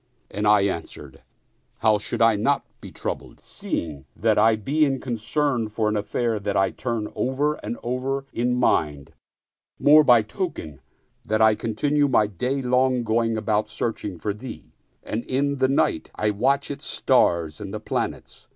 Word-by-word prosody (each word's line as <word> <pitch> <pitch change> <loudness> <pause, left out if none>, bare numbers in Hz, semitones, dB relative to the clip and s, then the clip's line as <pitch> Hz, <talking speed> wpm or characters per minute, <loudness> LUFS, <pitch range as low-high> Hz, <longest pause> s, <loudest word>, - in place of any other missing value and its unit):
" - - -31
and 105 +2 -1
I 105 -1 +6
an 95 -4 0
swered, - - -13 0.3
" - - -43
How 110 -2 +4
should 115 +1 -1
I 115 -1 +5
not 140 +8 +1 0.2
be - - -10
troubled, - - -6
seeing 75 -5 -5
that - - +2
I 110 +1 +5
be 140 +9 0
in 135 -3 +1
concern 125 +1 -1
for 110 0 -1
an 105 - -1
affair 105 +1 -1 0.2
I 95 -1 +2
turn 115 -4 -3
over 140 +4 0
and 115 +3 -4
over 130 +3 -2
in 125 +1 0
mind, 75 - 0 0.6
more 150 +1 +6
by 120 -5 +5
token 105 - -5 0.5
that 110 0 +1
I 110 -1 +6
continue 145 +7 0
my 120 -5 +3
day 125 +8 -2
long 125 0 +2
going 115 0 0
about 105 -1 0
searching 105 -6 -4
for 105 +4 -3
thee 120 +5 -10 0.3
and 110 +2 -4
in 140 +2 0
the 130 - +4
night 135 - 0
I 105 0 0
watch 135 +8 0
its 140 0 -7
stars 85 0 +1
and 100 - -6 0.2
planets?" - - -4
115 Hz, 170 wpm, -24 LUFS, 105-130 Hz, 0.6 s, I